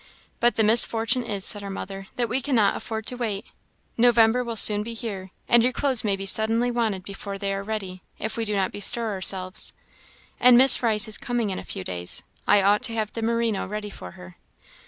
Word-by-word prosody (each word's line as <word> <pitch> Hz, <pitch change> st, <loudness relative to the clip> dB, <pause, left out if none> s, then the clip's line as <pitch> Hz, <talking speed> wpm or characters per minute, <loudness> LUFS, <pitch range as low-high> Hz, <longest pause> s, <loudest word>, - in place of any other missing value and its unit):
"But 240 Hz, +1 st, +1 dB
the 220 Hz, -, +1 dB
misfortune 230 Hz, +2 st, +2 dB
is," 200 Hz, -4 st, -3 dB
said 205 Hz, -, +3 dB
her 200 Hz, -, -8 dB
mother, 195 Hz, 0 st, -8 dB
"that 240 Hz, -1 st, -1 dB
we 255 Hz, +4 st, -1 dB
cannot 235 Hz, -7 st, +1 dB
afford 220 Hz, -1 st, -6 dB
to 250 Hz, -, -4 dB
wait. 220 Hz, -3 st, -4 dB, 0.5 s
November 235 Hz, 0 st, +3 dB
will 235 Hz, -1 st, -6 dB
soon 210 Hz, -1 st, +7 dB
be 230 Hz, +2 st, -7 dB
here, 200 Hz, -5 st, -7 dB, 0.2 s
and 240 Hz, -, +4 dB
your 250 Hz, +2 st, +1 dB
clothes 260 Hz, -2 st, 0 dB
may 205 Hz, -3 st, 0 dB
be 195 Hz, 0 st, -8 dB
suddenly 225 Hz, +4 st, +1 dB
wanted 220 Hz, -6 st, -2 dB
before 200 Hz, +1 st, -8 dB
they 195 Hz, 0 st, -3 dB
are 195 Hz, -, -4 dB
ready, 200 Hz, -3 st, -6 dB, 0.2 s
if 220 Hz, -, -5 dB
we 230 Hz, -, -3 dB
do 210 Hz, -1 st, -2 dB
not 190 Hz, -1 st, -1 dB
bestir 220 Hz, +2 st, +2 dB
ourselves. 185 Hz, -1 st, -1 dB, 0.7 s
And 245 Hz, 0 st, +6 dB
Miss 265 Hz, +1 st, +7 dB
Rice 220 Hz, -3 st, +4 dB
is 215 Hz, -, +3 dB
coming 240 Hz, -4 st, -3 dB
in 185 Hz, -, -5 dB
a -, -, -9 dB
few 95 Hz, -, -7 dB
days 90 Hz, -1 st, -4 dB, 0.2 s
I 200 Hz, -, +4 dB
ought 205 Hz, +3 st, +2 dB
to 230 Hz, -2 st, -3 dB
have 215 Hz, -1 st, -4 dB
the 230 Hz, -, -5 dB
merino 230 Hz, -2 st, -2 dB
ready 210 Hz, +1 st, -7 dB
for 90 Hz, -, -11 dB
her." 90 Hz, 0 st, -14 dB
215 Hz, 215 wpm, -23 LUFS, 195-235 Hz, 0.7 s, soon